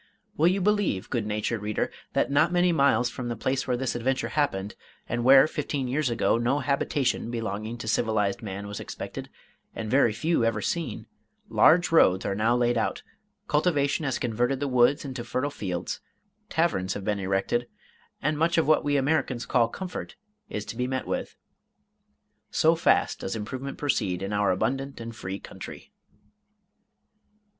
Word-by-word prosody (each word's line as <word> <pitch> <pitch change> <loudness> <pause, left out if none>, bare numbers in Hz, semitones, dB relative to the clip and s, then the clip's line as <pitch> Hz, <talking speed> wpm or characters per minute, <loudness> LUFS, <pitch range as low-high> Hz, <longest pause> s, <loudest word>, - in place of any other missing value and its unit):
Will 160 - +4
you 190 +2 +2
believe, 205 - +1
good 115 -4 -1
natured 105 +1 -2
reader, 105 0 -1 0.2
that - - +1
not 140 - +4
many 175 0 +3
miles 140 -6 +3
from 125 0 -5
the 120 - -2
place 130 +4 -1
where 125 -1 +1
this 130 0 -1
adventure 130 +3 -1
happened, 105 -10 -1 0.3
and 120 0 -2
where 135 +2 +8
fifteen 145 -3 -3
years 135 +2 0
ago, 115 0 +2
no 125 +4 +1
habitation 140 -4 0
belonging 110 0 -4
to 115 - -7
civilized 110 -3 +1
man 100 -2 -5
was 100 0 -6
expected, - - -7 0.5
and 110 -1 -4
very 130 -3 +4
few 160 +4 0
ever 115 -2 +1
seen, 150 -1 -3 0.4
large 175 +2 +5
roads 95 - +5
are 100 - 0
now 110 +4 +2
laid 120 -1 +2
out, - - -2 0.4
cultivation 150 -1 +1
has 135 -3 0
converted 125 +2 0
the 145 - -1
woods 125 +3 +3
into 130 -3 -5
fertile 130 +4 -2
fields, 90 -9 -4 0.5
taverns 155 - 0
have 100 - -6
been 105 -1 0
erected, 95 +5 0 0.6
and 150 +1 0
much 170 +2 +2
of 165 - +3
what 155 - +4
we 145 0 +2
Americans 135 -3 0
call 120 -2 +3
comfort 180 +9 -6 0.3
is 105 - -4
to - - -7
be 125 +1 -1
met 130 0 -2
with! - - -3 1.1
So 160 +1 +4
fast 165 - +2
does 95 - -4
improvement 130 +6 -5
proceed 100 -11 0
in 100 +2 -3
our 105 0 +2
abundant 135 +9 -1
and 115 0 -7
free 95 0 -5
country. - - -10
120 Hz, 165 wpm, -27 LUFS, 110-145 Hz, 1.1 s, where